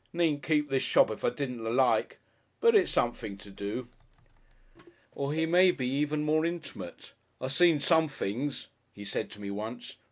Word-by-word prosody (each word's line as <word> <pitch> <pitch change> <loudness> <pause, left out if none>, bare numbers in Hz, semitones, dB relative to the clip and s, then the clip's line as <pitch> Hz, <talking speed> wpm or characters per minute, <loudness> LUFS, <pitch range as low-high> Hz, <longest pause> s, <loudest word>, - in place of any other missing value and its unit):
Needn't 165 -4 +1
keep 150 -2 0
this 135 -1 +2
shop - - +4
if 110 - -7
I - - +3
didn't 125 -2 -5
like. 125 +3 +2 0.4
But 465 0 +5
it's 400 -4 +4
something 115 -4 -1
to 100 0 -13
do."... 100 +5 -5 1.2
Or 140 0 -3
he 160 +2 +1
may 180 +3 +5
be 135 -7 -1
even 150 +3 0
more 155 +1 +2
intimate. 165 - -6 0.3
"I 130 - -3
seen 165 +2 +4
some 160 +2 +3
things," 135 +1 -3 0.3
he 100 - -10
said - - -3
to 105 - -12
me 100 -1 -5
once. 110 +4 -6
140 Hz, 170 wpm, -29 LUFS, 115-160 Hz, 1.2 s, But